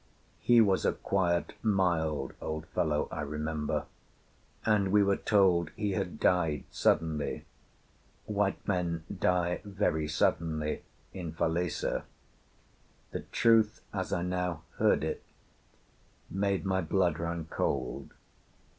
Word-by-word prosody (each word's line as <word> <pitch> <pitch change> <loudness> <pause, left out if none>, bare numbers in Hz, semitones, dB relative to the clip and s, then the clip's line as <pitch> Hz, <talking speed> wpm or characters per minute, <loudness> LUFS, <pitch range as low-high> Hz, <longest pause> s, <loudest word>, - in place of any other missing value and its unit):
He 120 -1 +5
was 100 -3 +3
a - - +2
quiet, 85 -3 0
mild 85 - +1
old 80 0 -4
fellow, 75 -2 0
I - - -3
remember, 75 +1 -2 0.8
and 105 -3 +3
we 105 0 +5
were 100 0 +3
told 95 -6 +3
he 105 -1 -1
had 95 - -3
died 80 -6 +2
suddenly: 80 -2 0 0.8
white 105 -2 -1
men 85 -4 0
die 90 -1 +1
very 95 -6 0
suddenly 80 0 0 0.3
in 85 -4 -5
Falesá. 85 0 0 1.1
The - - -3
truth, 115 -2 +4
as - - -3
I 85 - 0
now 90 -3 -2
heard - - +3
it, - - -3 1.1
made 100 0 0
my 95 -1 +1
blood 85 -2 +1
run 85 -1 -3
cold. - - -2
90 Hz, 115 wpm, -30 LUFS, 80-100 Hz, 1.1 s, He